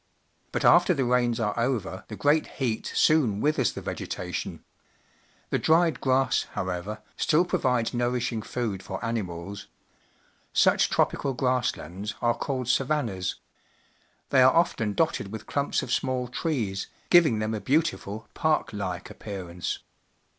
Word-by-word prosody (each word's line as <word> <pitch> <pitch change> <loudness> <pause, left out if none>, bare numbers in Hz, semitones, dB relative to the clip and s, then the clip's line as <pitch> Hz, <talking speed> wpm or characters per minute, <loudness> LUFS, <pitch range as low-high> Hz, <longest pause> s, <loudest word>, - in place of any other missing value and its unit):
But - - -1
after 180 - +6
the 135 -3 0
rains 120 -1 +2
are 105 -2 0
over, 120 -3 -1
the - - -7
great 150 +2 +2
heat 120 -5 -1
soon 130 -10 +3
withers 145 -1 +2
the - - -7
vegetation. - - -5 0.9
The - - +2
dried 165 -2 +3
grass, 130 0 +2
however, 95 +4 -4
still 165 +4 +3
provides 125 -8 0
nourishing 120 -1 -1
food 110 -4 -3
for 95 +2 -5
animals. 100 -4 -4 0.9
Such - - +4
tro - - +4
pical 135 -3 -4
grass 125 -1 +1
lands 95 +7 -6
are 120 0 +2
called 130 +1 -3
samnnas. 125 -8 0 1.0
They 130 - +6
are 130 +1 +7
often 115 -11 +2
dotted 155 -11 0
with 110 - -7
clumps 140 0 0
of - - -2
small 130 -2 0
trees, 120 - -2 0.2
giving 165 -10 +6
them 110 +1 -1
a 110 - -3
beautiful, 130 -8 0
park 155 -7 +1
like 95 -4 -4
appearance. 90 -4 -5
120 Hz, 140 wpm, -27 LUFS, 105-135 Hz, 1.0 s, are